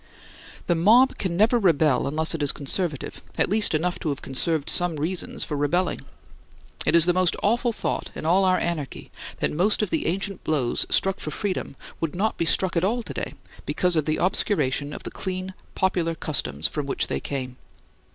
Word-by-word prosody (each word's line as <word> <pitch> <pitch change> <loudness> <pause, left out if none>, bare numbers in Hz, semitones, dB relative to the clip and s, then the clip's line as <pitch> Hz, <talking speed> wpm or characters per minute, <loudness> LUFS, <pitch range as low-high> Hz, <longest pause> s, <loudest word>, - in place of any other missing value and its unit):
The 175 - +2
mob 225 +10 +4
can 175 -3 -2
never 225 +4 +4
rebel 155 - +2
unless 155 +4 +3
it 165 - -3
is 145 - +2
conservative, 150 +1 -3 0.2
at - - +1
least 210 -5 +4
enough 175 +3 -1
to 160 - -2
have 140 - -4
conserved 145 +3 -1
some 175 -2 +1
reasons 165 +5 -3
for 150 - -4
rebelling. 145 +6 0 0.9
It - - +4
is 170 -1 +7
the 175 - +3
most 185 -1 +2
awful 240 +3 +2
thought - - -3
in - - -6
all 180 +4 +4
our 185 -1 +3
anarchy, 155 -6 -4 0.3
that - - +1
most 200 +7 +2
of 205 - -3
the - - 0
ancient 195 +3 -2
blows 135 -6 0
struck 195 0 +2
for - - -5
freedom 185 -4 -3 0.2
would 165 -1 -3
not 210 +4 0
be 170 - -1
struck 185 +2 +2
at 170 - +1
all 235 +5 0
to - - -7
day, - - -5 0.3
because 180 -2 +1
of 155 -2 +1
the 155 - 0
obscuration 150 -6 +1
of - - -8
the - - -6
clean, 185 0 -4 0.2
popular 175 -3 0
customs 75 - 0
from 150 -2 -4
which - - 0
they - - -3
came. 130 -3 -5
170 Hz, 195 wpm, -24 LUFS, 150-190 Hz, 0.9 s, is